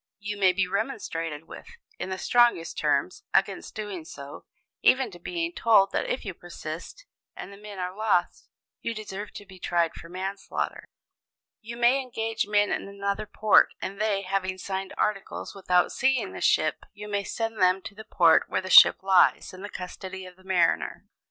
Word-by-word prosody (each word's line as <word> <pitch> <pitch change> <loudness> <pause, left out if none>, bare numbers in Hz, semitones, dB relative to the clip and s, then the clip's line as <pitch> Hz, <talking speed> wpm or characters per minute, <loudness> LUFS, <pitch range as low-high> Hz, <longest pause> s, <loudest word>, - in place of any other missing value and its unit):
You 205 0 -5
may 195 -2 +4
be 190 +1 0
remonstrated 165 - -3
with, - - -11 0.3
in - - -4
the 190 - -3
strongest 240 -8 +3
terms, - - 0
against - - 0
doing 205 -6 -5
so, 140 -2 -10 0.4
even 255 -3 +3
to 175 - -12
being 340 - -3
told 205 -8 +4
that - - -1
if 250 - -2
you 195 - -4
persist, 170 - -8 0.3
and 200 - -8
the - - -12
men 205 -1 -10
are 180 0 -4
lost, 215 -4 0 0.3
you 230 - -3
deserve 210 -1 -6
to 205 - -9
be 190 -1 -14
tried 170 -2 +1
for 170 - -11
manslaughter. 190 +2 -4 0.8
"You 230 +1 -8
may 240 +3 +4
engage 225 -4 -3
men 205 0 +2
in - - -2
another 200 +1 -3
port, 215 0 +4
and 195 +2 -5
they, 205 -2 +1
having 190 0 -2
signed 190 0 -4
articles 205 -2 -2
without 180 -2 +2
seeing 265 -1 +1
the - - -7
ship, - - +2
you 210 0 -9
may 200 -1 -1
send 225 0 -3
them 185 +1 +4
to - - -8
the 215 +2 -10
port 170 -6 +4
where - - 0
the 185 0 -6
ship - - +9
lies 190 -1 +4
in 185 - -10
the 205 - -6
custody 190 0 -7
of 180 0 -13
a - - -19
mariner. 180 -3 +1
195 Hz, 185 wpm, -26 LUFS, 185-215 Hz, 0.8 s, ship